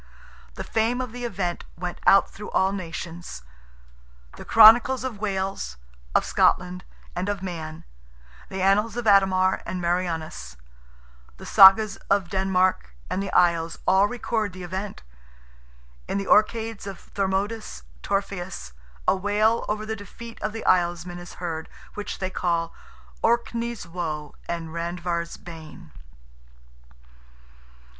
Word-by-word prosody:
The - - -5
fame 225 +3 0
of 255 -3 -3
the 245 +1 -6
event 185 -6 -3
went 175 0 -5
out 195 - +7
through 210 +1 -9
all 190 0 +2
nations. 170 - -6 0.9
The - - -9
chronicles 230 +3 +7
of 245 -6 -4
Wales, 190 - -3 0.4
of - - +4
Scotland, 180 0 +2 0.3
and 180 +3 -2
of 200 -2 -3
Man; 160 -4 -6 0.7
the 190 -1 -3
annals 210 +4 +2
of 240 - -3
Ademar 190 -2 +4
and 185 - -4
Marianus; 165 - -2 0.8
the - - -11
Sagas 200 +1 +7
of 195 -3 +2
Denmark 185 - +1 0.2
and 190 - -1
the 195 - -4
Isles 170 -2 +3
all 190 +2 +4
record 220 -3 -2
the 185 0 -8
event. 190 +3 -5 1.0
In - - -1
"the 200 - -2
Orcades" 220 0 +2
of 195 -3 -10
Thormodus 195 - -2 0.2
Torfaeus, 190 - -3 0.4
a - - +5
wail 210 +4 +1
over 215 0 -2
the 220 0 -3
defeat 225 +3 -11
of - - -1
the 225 +1 -7
Islesmen 175 -1 +1
is 175 0 -10
heard, 165 -2 -5 0.2
which 210 - -5
they 185 -1 -3
call 170 -2 -1 0.5
"Orkney's 235 -1 0
woe 160 -4 -4 0.2
and 170 -1 -3
Randver's 170 0 -3
bane." 165 0 -11
190 Hz, 130 wpm, -25 LUFS, 175-210 Hz, 1.0 s, out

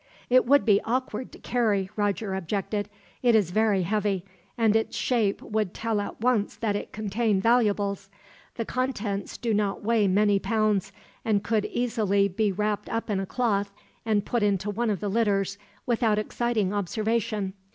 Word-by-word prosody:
"It 255 -1 +5
would 285 +2 +5
be 205 -3 +4
awkward 250 0 -2
to - - -12
carry," 210 -6 0
Roger 205 -1 -1
objected. 200 +3 -2 0.3
"It 240 -2 +4
is 200 -6 +2
very 210 -2 +2
heavy, 200 -1 0 0.3
and 220 -2 +3
its 225 - 0
shape 220 -6 0
would 215 -4 -2
tell 225 -2 -1
at 205 - -6
once 235 -4 +1
that 215 -3 -1
it 205 - -4
contained 210 -1 0
valuables. 205 -5 +2 0.5
The 230 - -3
contents 220 -6 -2
do 235 -2 -1
not 205 -1 0
weigh 220 -1 +3
many 200 +1 +3
pounds, 210 -3 0 0.3
and 210 -2 +1
could 215 -2 +1
easily 215 -5 +1
be 205 +2 0
wrapped 210 +1 -2
up 230 -1 -2
in 195 - 0
a 195 - -3
cloth 205 -5 0 0.3
and 215 -3 +1
put 240 - 0
into 205 0 +1
one 230 +3 -1
of 200 -4 -1
the 210 - -2
litters, 200 -2 +1 0.3
without 230 -3 +2
exciting 215 -2 0
observation. 210 0 -1
210 Hz, 165 wpm, -26 LUFS, 200-230 Hz, 0.5 s, It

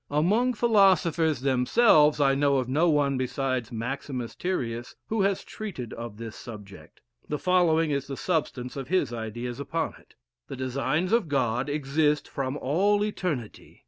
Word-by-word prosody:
Among 205 - +2
philosophers 185 - +3
themselves, 150 - +4
I 135 -1 +4
know 140 0 +2
of 130 -2 -1
no 155 +7 +2
one 140 -3 +2
besides 130 -2 -2
Maximus 125 +1 -4
Tyrius 120 -10 -3
who 220 -1 0
has 195 0 +1
treated 175 - -7
of 115 -2 -7
this 115 -1 -7
subject. 100 -8 -11 0.3
The 150 - -1
following 165 -3 +2
is 140 -1 -1
the 135 -1 -5
substance 140 -7 -2
of 135 -2 -5
his 185 -7 +1
ideas 120 +2 -5
upon 140 +4 -2
it: - - -24 0.3
The - - -6
designs 135 - -1
of 230 -7 +3
God 125 -1 0
exist 150 +1 +1
from 135 0 -3
all 200 +10 +2
eternity. 160 - -5
140 Hz, 150 wpm, -27 LUFS, 125-170 Hz, 0.3 s, themselves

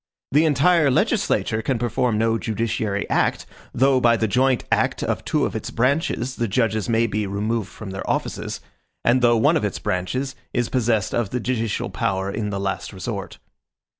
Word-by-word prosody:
The 150 +4 +4
entire 155 +1 +4
legislature 110 -3 +1
can 125 +2 0
perform 120 0 0
no 115 +1 +1
judiciary 110 -2 -2
act, - - +1 0.3
though 135 0 +3
by 115 -1 +4
the 110 - +1
joint 130 +3 +2
act - - +1
of - - -2
two - - +1
of - - -4
its - - -4
branches 130 0 0
the 120 - 0
judges 110 0 0
may 115 0 +3
be 105 -2 -1
removed 105 +1 -2
from 105 -3 -9
their 95 - -5
offices, - - -2 0.4
and 125 +2 +4
though 120 -1 +5
one 110 - +4
of - - -2
its 105 - -1
branches 130 +9 -2 0.2
is 120 -1 0
possessed 115 -5 +1
of 120 -4 0
the 125 - -2
judicial 115 -3 -2
power 95 +1 -1
in 105 0 -3
the 100 -1 -3
last 95 0 -3
resort. 100 +1 -5
115 Hz, 180 wpm, -22 LUFS, 105-125 Hz, 0.4 s, though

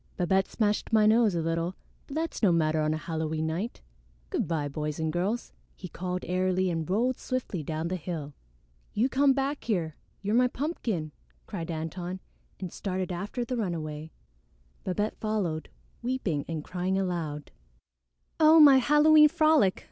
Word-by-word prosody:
"Babette 190 +2 +2
smashed 210 0 -1
my 215 -1 +5
nose 220 -2 +4
a 165 - 0
little, 165 +2 -1 0.3
but 275 - -8
that's 325 +1 -2
no 200 -5 +5
matter 155 -2 +2
on 155 0 +1
a 155 - 0
Halloween 160 -1 -2
night. 175 +9 -3 0.5
Good - - 0
by, 155 -4 -1
boys 150 +1 -4
and 160 -1 -1
girls," 200 +7 -2 0.2
he 185 - -8
called 180 +1 -4
airily 185 0 +1
and 165 0 -3
rolled 240 +6 +1
swiftly 250 -9 -3
down 155 +2 -3
the 185 +2 -2
hill. 155 -4 -5 0.6
"You 235 +5 +2
come 275 +1 +4
back 275 +2 -2
here; 170 -9 -1 0.3
you're 205 +2 0
my 250 +2 +5
pumpkin," 235 - -3 0.3
cried 175 -5 -6
Antone 175 +3 -4 0.4
and 185 -3 -6
started 185 -2 -3
after 205 +7 -3
the 250 +1 -3
runaway. 160 -6 -3 0.7
Babette 205 +4 -2
followed, 190 -8 -2 0.3
weeping 235 - -1
and 160 -2 -4
crying 185 +2 -2
aloud. 165 -6 -3 0.9
"Oh, 315 +1 +7
my 285 -3 +9
Halloween 300 +4 +6
frolic! 310 -11 +3
185 Hz, 155 wpm, -28 LUFS, 160-235 Hz, 0.9 s, my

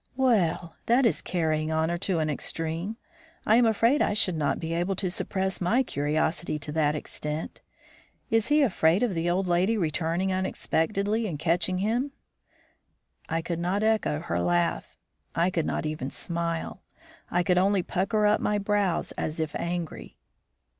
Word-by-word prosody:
"Well! 195 -10 +1
that 245 +3 +4
is 230 - +2
carrying 155 -3 -1
honor 160 +2 0
to 185 -1 0
an 155 -1 0
extreme. 165 +7 -3 0.5
I 220 - +5
am 240 -1 +5
afraid 230 +6 +3
I - - +2
should 195 -4 +2
not 150 -2 0
be 165 0 -3
able 175 +3 0
to 185 -1 -1
suppress 190 +1 -2
my 230 +9 +3
curiosity 155 - -1
to 150 0 -6
that 150 -1 +1
extent. 150 +1 -4 0.7
Is 225 0 +3
he 295 0 +4
afraid 180 -4 +3
of 235 -5 +1
the 170 0 0
old 185 +2 +1
lady 185 +5 +2
returning 170 +2 0
unexpectedly 200 +3 0
and 165 -6 -4
catching 175 +4 +1
him?" 235 +8 0 1.2
I 165 0 -1
could 170 0 -3
not 185 +4 0
echo 220 -8 +2
her 90 - -2
laugh; 85 0 0 0.4
I 175 +2 +2
could 165 -3 -1
not - - -2
even 155 -3 -3
smile; 170 +3 -3 0.5
I 175 0 +1
could 180 -1 +3
only 195 0 +2
pucker 205 +5 0
up 210 +1 +3
my 210 - +1
brows 200 -3 0
as 155 +1 -3
if 160 -2 -2
angry. 170 -2 -4
175 Hz, 160 wpm, -27 LUFS, 160-205 Hz, 1.2 s, I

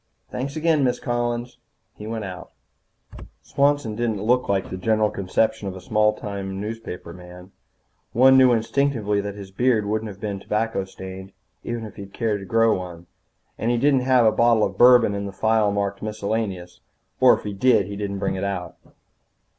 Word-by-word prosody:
"Thanks 135 +3 -4
again, 155 -2 +2
Miss 125 -2 +1
Collins." 120 0 -3 0.3
He 105 - -10
went 110 -2 -4
out. 90 -2 -9 0.9
Swanson 140 -5 +1
didn't 110 -3 -2
look 125 +2 +1
like 95 -1 0
the 95 - -4
general 110 +2 +1
conception 100 +2 -1
of 95 - -5
a - - -8
small 105 +3 +2
town 100 -2 -6
newspaperman. 90 -4 -8 0.6
One 130 +2 +6
knew 130 -1 +6
instinctively 115 -2 0
that 100 0 -6
his 100 -2 -10
beard 115 0 +1
wouldn't 110 +1 -2
have 100 -1 -11
been 100 -2 -4
tobacco 105 -1 -2
stained 95 0 -10 0.3
even 120 -1 -4
if 105 - -11
he'd 100 -1 -10
cared 110 -3 -1
to 95 - -10
grow 115 0 +3
one. 85 -2 -9 0.5
And 115 - -1
he 120 - +2
didn't 140 +2 +3
have 125 -2 +3
a 110 - +5
bottle 115 -2 +3
of 95 - -1
bourbon 120 -1 +6
in 100 0 -3
the - - -6
file 110 +1 +1
marked 100 0 -2
Miscellaneous, 100 -4 -4 0.4
or - - +7
if - - -12
he 105 - -4
did 100 0 +3
he 100 +1 -7
didn't 100 -1 -4
bring 100 0 -1
it 95 0 -4
out. 95 -3 -4
105 Hz, 180 wpm, -23 LUFS, 100-120 Hz, 0.9 s, or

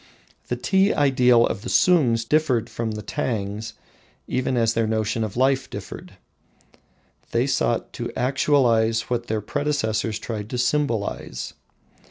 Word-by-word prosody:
The 125 - -1
tea 190 +10 +2
ideal 125 -4 +4
of - - -3
the 120 - -6
Sungs 125 -11 +3
differed 125 -7 +1
from 110 0 -3
the 105 0 -6
Tangs 110 -3 -3 0.5
even 130 0 -1
as 115 -1 +2
their 115 -1 +1
notion 110 0 -1
of 110 0 -5
life 130 +1 +2
differed. - - -8 1.2
They - - +1
sought - - 0
to - - -5
actualize 120 -4 +2
what 120 -1 -1
their 110 -1 -1
predecessors 110 -4 -1
tried 110 -2 -5
to 125 - -3
symbolise. 120 - -1
115 Hz, 135 wpm, -23 LUFS, 110-130 Hz, 1.2 s, ideal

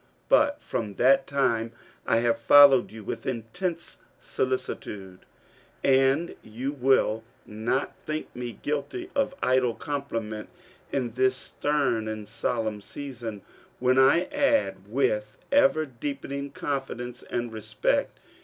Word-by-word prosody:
But 290 +1 +3
from 105 -4 -3
that 135 +5 +4
time 115 -5 0 0.3
I 115 - +3
have 115 -1 +1
followed 135 +2 +7
you 110 0 -9
with 115 +3 -5
intense 130 - -4 0.2
solicitude, 100 -7 -3 0.4
— - - -28 0.2
and 135 +5 +3
you 125 +6 -4
will 130 -5 +2 0.2
not 110 +6 -2
think 155 0 -4
me 120 -1 -4
guilty 150 - -4
of 275 -1 0
idle 125 -2 +2
compliment, 115 -7 -4 0.4
in 125 -4 -1
this 130 +2 +2
stem 135 -6 0
and 110 -1 -5
solemn 110 -1 -2
season, 120 -4 -7 0.3
when 130 +1 +3
I 135 +6 +6
add, 280 - +1
with 105 -3 0
ever 275 - +4
deepening 140 +1 -5
confidence 135 -4 -4
and 120 -1 -4
respect. 110 0 -1
130 Hz, 120 wpm, -27 LUFS, 115-140 Hz, 0.4 s, followed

